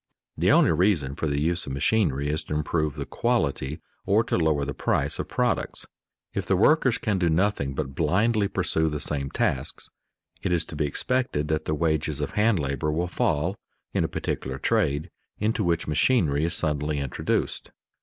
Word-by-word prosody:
_ - - -66 0.4
The - - +5
only - - +5
reason 80 -5 +2
for 80 - -2
the 70 -1 0
use 85 +3 0
of 65 - -4
machinery 75 -2 +1
is 75 +1 -1
to 75 - -3
improve 75 -1 0
the - - -4
quality 80 - -1 0.2
or 105 +3 +3
to - - -1
lower 80 -4 +2
the - - -3
price - - 0
of - - -3
products. - - -1 0.5
If 95 -2 -3
the 95 - +3
workers 130 - +4
can 105 -4 -1
do 85 -2 +2
nothing 80 -5 +1
but 70 -3 -3
blindly 100 - +2
pursue 80 -4 0
the 75 -1 -3
same 70 -2 -2
tasks, - - -2 0.5
it - - -1
is 85 -1 +1
to - - -9
be 75 0 0
expected 75 - -1
that 80 0 0
the 75 - 0
wages 80 -2 0
of 75 - -2
hand 105 0 +3
labor 70 0 -1
will 85 +3 0
fall 90 +2 0 0.4
in - - +1
a - - +1
particular 65 0 -3
trade 80 -4 0 0.3
into 110 +1 0
which 85 -2 0
machinery 75 - +2
is 85 - -1
suddenly 75 -1 -1
introduced. 70 -3 -2
80 Hz, 185 wpm, -26 LUFS, 75-95 Hz, 0.5 s, The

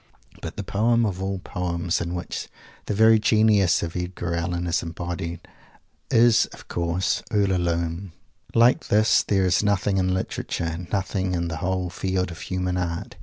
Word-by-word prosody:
But - - -7
the - - -3
poem 115 +3 +2
of 95 -3 -3
all 95 0 -2
poems 90 -1 -2
in 85 +1 -3
which 85 - -5 0.4
the 105 - -1
very 110 +1 +6
genius 105 -4 +3
Edgar 85 0 -4
Allen 85 +1 -2
is 85 +1 0
embodied 85 0 -5 0.7
is, 115 -1 +5
of - - -14
course, 85 +2 -1
"Ulalume." 90 -3 0 0.4
Like 115 +2 +4
this, 110 +1 +4
there 95 -2 +1
is 90 -1 +3
nothing; 100 -1 +1
in 95 -1 +1
Literature 85 -2 -3
nothing 95 -2 -1
in 85 -1 -1
the 80 - -4
whole 90 +1 -2
field 95 -1 -1
of 85 - -9
human 90 -1 -2
art. 85 -2 -3
90 Hz, 155 wpm, -24 LUFS, 85-100 Hz, 0.7 s, very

